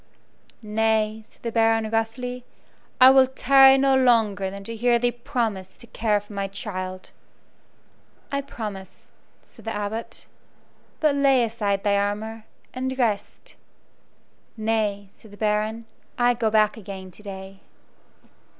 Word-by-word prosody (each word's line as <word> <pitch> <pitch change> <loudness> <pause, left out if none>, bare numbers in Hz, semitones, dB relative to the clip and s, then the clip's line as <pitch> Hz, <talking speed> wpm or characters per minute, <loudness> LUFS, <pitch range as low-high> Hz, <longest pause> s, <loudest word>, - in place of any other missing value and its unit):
"Nay," 220 0 0
said - - -28
the 230 - -3
Baron, 225 -1 +2
roughly, 245 +3 -2 0.6
"I 260 +1 +9
will 265 -1 +6
tarry 270 +1 +6
no 270 0 +3
longer 225 -7 +3
than 200 +1 -8
to 230 +3 -6
hear 240 +1 +3
thee 240 +1 +1
promise 230 -7 -3
to - - -8
care 220 -2 0
for 205 +1 -14
my 200 -1 -2
child." 185 -2 -6 1.2
"I 280 0 0
promise," 210 -8 -8 0.3
said - - -19
the 225 - -3
Abbot; 210 +2 -5 0.8
"but 305 -2 +3
lay 275 -3 +3
aside 210 -3 -1
thy 200 -1 +2
armor, 215 +2 -3 0.3
and 260 +1 -3
rest." 215 -5 -2 1.0
"Nay," 215 -2 -1
said 220 - -18
the 205 - -14
Baron, 215 +2 -1 0.3
"I 245 0 +3
go 230 -2 0
back 215 0 +2
again 190 -2 -9
to 195 - -15
day." 195 -1 -9
220 Hz, 135 wpm, -24 LUFS, 205-245 Hz, 1.2 s, I